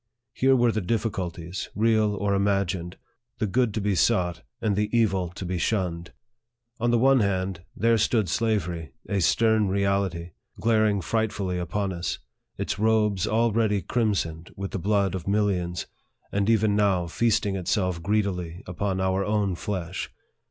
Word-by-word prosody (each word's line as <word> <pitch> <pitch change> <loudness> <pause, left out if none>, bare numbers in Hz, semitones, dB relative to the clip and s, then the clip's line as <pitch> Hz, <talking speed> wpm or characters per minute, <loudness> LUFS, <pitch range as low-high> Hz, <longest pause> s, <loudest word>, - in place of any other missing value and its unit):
Here 135 +1 +3
were 120 -2 +3
the 110 - -1
difficulties, 95 -4 -3
real 110 -1 +2
or 100 0 0
im 100 0 +2
agined 95 -3 -1 0.4
the 110 - 0
good 120 +3 +1
to 110 - -1
be 100 0 +1
sought, 90 0 +1 0.2
and 105 -2 0
the 105 +1 0
evil 95 -7 +2
to 95 - -5
be 90 0 -2
shunned. 85 -4 -1 0.7
On 120 +1 +1
the 120 - +3
one 135 +2 +5
hand, 95 -3 -1
there 115 +2 +3
stood 110 -1 +2
slavery, 85 -7 -1
a 100 +1 0
stern 110 +4 +3
reality, 95 -3 0 0.3
glaring 110 -1 +2
frightfully 105 -2 -1
upon 95 +3 -2
us, 85 0 -3 0.4
its - - -3
robes 105 -3 +2
already 110 -3 +2
crimsoned 90 -7 -1
with 100 0 -4
the - - -3
blood 100 0 +1
of 95 -2 -5
millions, 95 -4 0 0.5
and 100 +1 0
even 110 -2 +3
now 100 -4 +2
feasting 100 +2 +1
itself 90 -1 -1
greedily 90 -3 -1
upon 95 +2 -2
our 95 +1 +1
own 105 -2 0
flesh. 90 -1 -4
100 Hz, 150 wpm, -26 LUFS, 90-110 Hz, 0.7 s, one